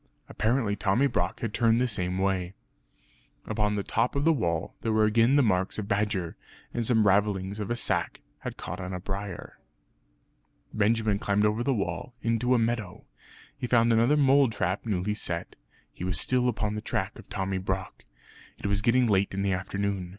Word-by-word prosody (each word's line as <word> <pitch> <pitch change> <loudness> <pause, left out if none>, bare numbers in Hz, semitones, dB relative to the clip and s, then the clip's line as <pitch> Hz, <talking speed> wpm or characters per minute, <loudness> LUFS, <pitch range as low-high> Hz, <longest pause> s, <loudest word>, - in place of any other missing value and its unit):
Apparently 110 -2 0
Tommy 105 +6 +2
Brock 95 -9 -1
had 115 -3 -3
turned 115 0 +3
the 125 - +2
same 90 -5 -2
way. 95 -1 -1 0.9
Upon 105 -1 0
the 100 - -1
top 125 - 0
of 140 +1 0
the 165 - +5
wall, 85 - -1
there 115 - -1
were 110 0 +3
again 115 +5 +4
the 145 - +5
marks 95 -4 +1
of 105 -2 -4
badger; 100 -5 -1 0.4
and 120 - -1
some 110 -2 +3
ravellings 100 0 +1
of 105 - -4
a 120 - 0
sack 120 - -1 0.2
had - - -6
caught - - -6
on 90 0 -5
a 90 - -3
briar. 95 0 -6 1.1
Benjamin 110 -1 +1
climbed 100 +1 +1
over 105 +2 +1
the 135 - +1
wall, 100 +1 -3
into 115 +2 +2
a - - +4
meadow. 115 -5 -2 0.5
He 135 -3 -4
found 115 -1 +4
another 120 +6 +4
mole 140 -2 +5
trap 100 0 -2
newly 100 0 0
set; 85 -5 -4 0.4
he - - -8
was 90 -3 +1
still 125 +4 +2
upon 105 -3 -2
the 105 - -4
track - - -3
of - - -14
Tommy 95 0 -2
Brock. 95 0 -4 0.5
It - - -10
was 100 0 +1
getting 125 +3 +3
late 100 -3 +1
in 100 - -1
the 100 -1 +1
afternoon. 95 0 -2
105 Hz, 185 wpm, -27 LUFS, 95-115 Hz, 1.1 s, the